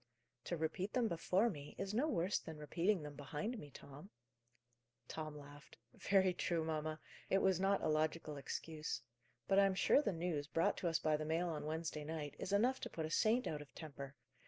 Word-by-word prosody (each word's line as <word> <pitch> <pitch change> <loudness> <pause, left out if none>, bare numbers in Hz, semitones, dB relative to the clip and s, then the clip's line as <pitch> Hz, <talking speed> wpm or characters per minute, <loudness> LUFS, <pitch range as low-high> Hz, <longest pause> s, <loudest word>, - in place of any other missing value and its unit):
"To 175 - -1
repeat 160 +5 -2
them 245 -3 +3
before 185 +4 +2
me 145 -4 -8
is 195 +1 -3
no 255 +8 +2
worse 185 - +1
than 160 -1 -8
repeating 170 +5 +1
them 145 -1 -6
behind 150 - -4
me, 145 - -9
Tom." 140 +6 -11 1.0
Tom 155 -1 -5
laughed. 145 0 -12 0.2
"Very 190 -2 +3
true, 170 -2 0
mamma. 155 -1 -2 0.3
It 195 - +4
was 190 -2 +3
not 195 +1 +2
a - - +2
logical 155 0 +1
excuse. 150 -2 -4 0.4
But 195 - +5
I 200 - +7
am 190 - 0
sure 275 - +5
the 280 - +1
news, 165 -4 -2
brought 165 +1 +2
to 175 - -1
us 165 -1 +3
by 155 -2 +2
the 155 - -3
mail 165 +3 +1
on 150 -2 -3
Wednesday 160 -1 -2
night, 150 -2 -4
is 195 - -3
enough 240 +6 +3
to - - -4
put 160 - -3
a 155 - -5
saint 230 +7 +3
out 150 -1 -2
of 145 - -12
temper. 140 -3 -7
160 Hz, 205 wpm, -39 LUFS, 150-190 Hz, 1.0 s, I